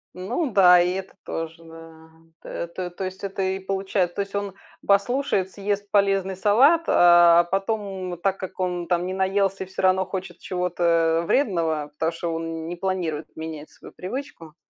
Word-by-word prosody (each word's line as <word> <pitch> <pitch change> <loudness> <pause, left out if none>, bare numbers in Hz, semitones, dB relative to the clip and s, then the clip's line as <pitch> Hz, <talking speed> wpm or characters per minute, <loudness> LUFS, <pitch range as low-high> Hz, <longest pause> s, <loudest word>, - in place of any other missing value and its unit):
Ну 240 - -2
да, 180 -3 +7
и 180 +1 +1
это 190 0 -6
тоже, 165 0 -6
да. 165 0 -14 0.3
Т 170 - -5
то 180 +1 -5
то 175 +2 -7
есть, 190 +1 -6
это 195 0 -3
и 190 0 -1
получает. 190 -2 -1
То - - -1
есть 200 0 -6
он 200 -1 -3 0.3
послушает, 200 -1 +1
съест 205 +1 -3
полезный 195 -2 +2
салат, 260 - +4
а 175 -1 +6
потом, 195 -2 -2
так 195 +2 0
как 190 0 -8
он 180 -2 -2
там 175 -1 0
не 185 - -3
наелся 190 0 0
и - - -17
всё 190 - -6
равно 190 0 +3
хочет 190 -2 -6
чего-то, 180 -1 -3 0.4
э, - - -6
вредного. 165 - 0
Потому 160 +2 -1
что, 165 0 -4
он 165 0 -4
не 175 - -4
планирует 175 -4 -3
менять 160 -1 -7
свою - - -15
привычку 185 - -7
185 Hz, 175 wpm, -24 LUFS, 170-195 Hz, 0.4 s, да